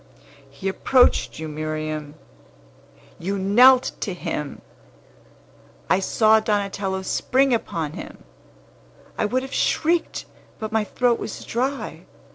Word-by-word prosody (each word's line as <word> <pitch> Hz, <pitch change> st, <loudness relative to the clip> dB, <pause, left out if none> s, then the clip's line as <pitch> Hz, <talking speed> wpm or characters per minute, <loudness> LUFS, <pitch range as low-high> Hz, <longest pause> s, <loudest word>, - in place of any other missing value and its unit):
He 140 Hz, +8 st, -6 dB
approached 250 Hz, +6 st, +3 dB
you, 160 Hz, -, -5 dB
Miriam. 155 Hz, -1 st, -4 dB, 1.0 s
You 195 Hz, +4 st, -2 dB
knelt 245 Hz, +7 st, +5 dB
to 195 Hz, -5 st, -3 dB
him! 150 Hz, -4 st, -5 dB, 1.3 s
I -, -, +5 dB
saw 220 Hz, +2 st, +4 dB
Donatello 200 Hz, -3 st, -1 dB
spring 265 Hz, +6 st, +2 dB
upon 165 Hz, -9 st, -2 dB
him! -, -, -9 dB, 0.9 s
I -, -, 0 dB
would 255 Hz, +5 st, 0 dB
have 265 Hz, -, -8 dB
shrieked, 335 Hz, +1 st, 0 dB, 0.3 s
but 220 Hz, 0 st, -5 dB
my 220 Hz, -1 st, +1 dB
throat 240 Hz, +3 st, +1 dB
was -, -, -6 dB
dry. 265 Hz, +4 st, -3 dB
205 Hz, 110 wpm, -23 LUFS, 165-245 Hz, 1.3 s, knelt